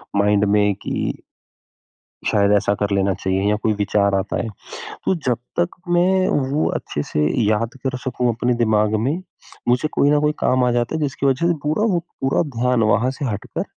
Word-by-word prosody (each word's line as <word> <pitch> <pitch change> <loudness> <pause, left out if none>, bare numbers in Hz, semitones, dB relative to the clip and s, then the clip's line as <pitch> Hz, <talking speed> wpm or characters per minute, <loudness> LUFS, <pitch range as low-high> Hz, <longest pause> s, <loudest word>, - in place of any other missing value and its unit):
mind 100 0 +3
में 105 -1 +3
कि - - -3 1.1
शायद 100 -1 +3
ऐसा 100 0 +2
कर 105 0 -2
लेना 100 0 +2
चाहिए 95 +1 -1
या 105 - +2
कोई 110 - +2
विचार 100 -1 +1
आता 95 +1 -1
है, 115 - -4 0.6
तो 190 - +2
जब 130 -8 -1 0.2
तक 175 0 +2 0.3
मैं 185 +2 +3 0.2
वो 150 +2 +1
अच्छे 75 - -3
से 75 0 -1 0.2
याद 110 +3 0
कर 130 -1 -1
सकूँ 125 -1 -1
अपने 120 +2 0
दिमाग 110 -2 +2
में, 135 +11 -1 0.5
मुझे 125 +5 +2
कोई 140 - +2
न 150 - +4
कोई 150 0 +2
काम 130 0 +2
आ 125 - +2
जाता 120 +4 0
है 160 - -2
जिसकी 140 -1 -2
वज़ह 135 +5 +2
से 175 - +3
पूरा 155 +9 +1
वो 175 - +2 0.2
पूरा 135 0 +2 0.2
ध्यान 125 -1 +2
वहाँ 115 +5 +2
से 135 +2 -5
हटकर, 105 -6 -3
120 Hz, 190 wpm, -20 LUFS, 105-140 Hz, 1.1 s, न